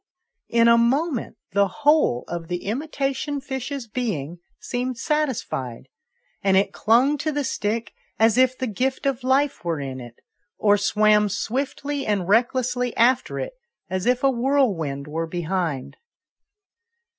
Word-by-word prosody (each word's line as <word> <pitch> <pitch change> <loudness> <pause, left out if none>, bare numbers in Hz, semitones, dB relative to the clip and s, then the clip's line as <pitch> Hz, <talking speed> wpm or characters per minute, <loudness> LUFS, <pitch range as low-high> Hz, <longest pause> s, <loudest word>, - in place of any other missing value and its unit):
in 235 0 +4
a 235 0 +6
moment, 265 +3 0
the 200 0 +3
whole 295 - +2
of 170 -1 -5
the 175 0 -4
imitation 275 +4 -2
fish's 265 -1 -5
being 180 - -3 0.2
seemed 245 +3 -3
satisfied, 230 - -2 0.5
and 195 -1 +3
it 195 - +2
clung 255 +7 +3
to 310 - -1
the 290 -1 -1
stick 225 -2 -2 0.2
as 225 0 +4
if 255 0 +3
the 260 - -2
gift 255 +5 -2
of 270 -2 0
life 270 0 +1
were 165 -3 -1
in 135 -2 -5
it, 120 -1 -10 0.4
or 205 -1 +4
swam 210 0 +3
swiftly 275 +6 -2
and 205 -6 -1
recklessly 250 +3 +1
after 245 +2 +3
it, - - -4 0.4
as 185 +3 -2
if 250 +1 +2
a 270 - +5
whirlwind 230 - 0
were 165 +2 -3
behind. 170 -4 -3
235 Hz, 140 wpm, -23 LUFS, 190-270 Hz, 0.5 s, a